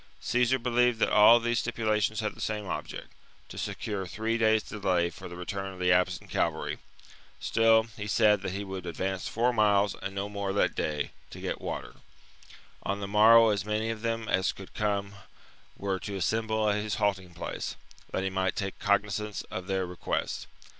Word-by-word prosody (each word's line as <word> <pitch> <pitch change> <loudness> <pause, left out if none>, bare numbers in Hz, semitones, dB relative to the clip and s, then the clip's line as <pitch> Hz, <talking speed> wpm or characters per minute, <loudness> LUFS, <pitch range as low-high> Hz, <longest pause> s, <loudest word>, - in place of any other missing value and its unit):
Caesar 125 +1 +2
believed 125 -1 +2
that - - +1
all 110 +3 +8
these 120 0 0
stipulations 110 -2 0
had 105 - -2
the - - -12
same 105 -1 -2
object, - - -5 0.2
— - - -31
to - - -9
secure 100 -3 -3
three 110 +4 -2
days' 110 -1 +3
delay 90 -4 0
for - - -9
the 90 - -8
return 95 +2 -4
of 95 - -11
the 90 0 +3
absent 90 0 +2
cavalry; - - -1 0.6
still, 115 0 +4
he 105 -1 -4
said 105 -1 +4
that 95 - -3
he 100 +1 -3
would 95 -2 -6
advance 95 +3 -3
four 120 +2 +1
miles 105 -2 +3
and 100 0 -5
no 100 +1 -2
more 100 -1 -3
that 100 - +2
day, 75 -2 -2 0.2
to - - -10
get - - -4
water; - - -5 0.8
on 100 +1 -2
the 100 - -4
morrow 110 +3 +7
as 100 -2 0
many 105 +2 -1
of 110 -1 -6
them 115 -1 -2
as 95 -2 +2
could 95 - -12
come 100 -1 -1 0.6
were 95 -1 -2
to 100 +1 -5
assemble 110 +3 0
at 105 0 +1
his 105 0 -2
halting 95 -5 -1
place, - - -4 0.4
that 95 - -1
he 95 - 0
might 95 -1 0
take 95 -1 -4
cognizance 105 +1 0
of 95 0 -5
their 95 -1 0
re 90 0 -8
quests. - - -2
105 Hz, 190 wpm, -29 LUFS, 95-110 Hz, 0.8 s, all